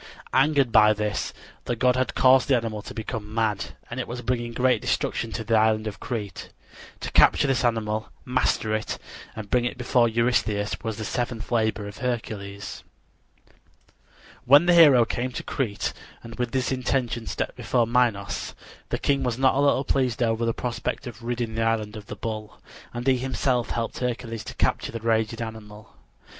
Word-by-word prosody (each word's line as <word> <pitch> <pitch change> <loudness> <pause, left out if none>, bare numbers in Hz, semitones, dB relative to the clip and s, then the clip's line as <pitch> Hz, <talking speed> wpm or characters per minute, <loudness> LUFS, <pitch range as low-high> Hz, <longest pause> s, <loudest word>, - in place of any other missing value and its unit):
Angered 135 -2 +3
by 105 -1 +6
this, 105 0 -2 0.3
the 120 - -1
god 125 +1 +3
had 130 -1 -1
caused 130 0 +5
the 135 - +4
animal 110 -2 -3
to - - -9
become 110 -1 -5
mad, 110 -3 -1
and 120 - -6
it 130 - -3
was 125 +1 -6
bringing 120 -1 -1
great 125 +2 +2
destruction 115 - -1
to 115 - -3
the 115 +1 -2
island 110 0 +3
of 105 -2 -5
Crete. 105 -6 -5 0.5
To - - -4
capture - - +5
this 135 -1 +1
animal, 110 -2 0 0.2
master 125 -3 +1
it, 110 0 -2 0.4
and 110 -2 -8
bring 125 -1 +3
it 120 - -2
before 125 -1 +3
Eurystheus, 110 -3 +1
was 110 -2 -4
the 110 - -4
seventh 120 -1 -3
labor 110 -3 0
of 100 - -9
Hercules. 105 -5 -4 1.6
When 145 +6 +7
the 175 - +5
hero 145 -8 +7
came 125 +3 -2
to - - -5
Crete 115 -7 -2 0.3
and 115 - -9
with 125 -1 0
this 130 +1 0
intention 125 -3 -1
stepped - - -3
before 120 -2 +1
Minos, 115 -4 0 0.3
the - - -1
king 140 -1 +1
was 120 -2 -1
not 130 0 +4
a 135 - 0
little 140 -1 +3
pleased 125 -3 0
over 115 0 +1
the - - +3
prospect 120 +3 -3
of 120 -2 -8
ridding 120 -1 -3
the 115 - -2
island 115 -1 0
of 105 -2 -9
the - - -6
bull, 110 -2 -6 0.3
and 120 +1 -5
he 135 -1 +4
himself 130 -1 0
helped 115 -1 -3
Hercules 120 -2 -3
to - - -8
capture - - 0
the 115 - -5
raging 115 0 0
animal. 110 -2 -10
115 Hz, 180 wpm, -25 LUFS, 110-125 Hz, 1.6 s, When